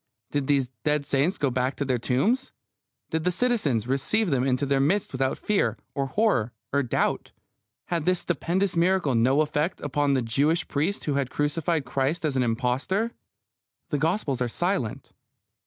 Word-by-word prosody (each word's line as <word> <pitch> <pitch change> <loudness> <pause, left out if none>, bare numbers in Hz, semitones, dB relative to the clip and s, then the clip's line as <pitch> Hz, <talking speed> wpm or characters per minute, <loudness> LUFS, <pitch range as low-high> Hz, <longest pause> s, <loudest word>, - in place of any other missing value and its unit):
Did 145 -2 -1
these 140 -3 +2
dead 150 -1 +1
saints 145 +7 +1
go 140 -4 0
back 130 +2 0
to 140 - -2
their 130 -2 0
tombs? 220 - +1 0.6
Did 160 0 -1
the 180 - +2
citizens 180 - +1
receive 160 - +1
them 130 -2 +2
into 130 +1 +1
their 140 0 +1
midst 175 +9 +1
without 130 0 -1
fear, 210 -1 0 0.2
or 140 -2 -1
horror, 130 - +1 0.2
or 140 - +3
doubt? 125 - -1 0.5
Had 170 -3 -2
this 185 -1 +2
stupendous 180 +2 0
miracle 170 -4 +2
no 130 +5 +3
effect 150 +3 -1
upon 145 0 +1
the 130 - +1
Jewish 145 +9 +1
priests 155 +8 -1
who 145 - 0
had 140 -2 0
crucified 150 +1 0
Christ 135 +6 -1
as 145 -3 0
an 130 - +2
impostor? 125 - 0 0.8
The 150 -4 0
Gospels 160 - 0
are 125 - +2
silent. 130 - -2
145 Hz, 170 wpm, -26 LUFS, 130-175 Hz, 0.8 s, or